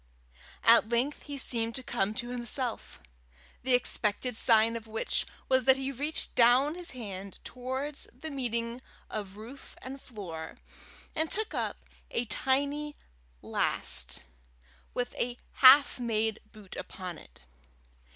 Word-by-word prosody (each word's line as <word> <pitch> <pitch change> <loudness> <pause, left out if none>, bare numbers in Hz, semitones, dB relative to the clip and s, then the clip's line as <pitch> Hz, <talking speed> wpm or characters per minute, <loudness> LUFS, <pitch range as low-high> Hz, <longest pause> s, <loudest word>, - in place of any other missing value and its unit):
At 230 -1 +6
length 245 +5 +1
he 285 -1 -5
seemed 230 -3 +1
to 260 - -3
come 215 -4 -1
to 240 0 -3
himself 245 0 -2 0.6
the 255 0 +5
expected 245 0 +2
sign 225 0 +5
of 225 -1 -6
which 220 0 -1 0.2
was 260 -2 +3
that 265 0 +7
he 270 0 -3
reached 290 +4 -2
down 250 +5 +5
his 350 0 -3
hand 200 -6 -7
towards 260 +3 -4
the 305 +6 -8
meeting 235 -2 -2 0.3
of 200 -2 -5
roof 240 +6 -11
and 265 +1 -8
floor, 180 -9 -8 0.6
and 315 0 0
took 435 +1 -2
up - - -3 0.2
a 240 - -1
tiny 285 +5 0 0.5
last - - -1 0.7
with 245 0 -2
a 245 0 0 0.2
half 270 +1 +8
made 220 -2 0
boot 205 -3 -12
upon 180 -3 -7
it. - - -17
245 Hz, 130 wpm, -30 LUFS, 220-270 Hz, 0.7 s, half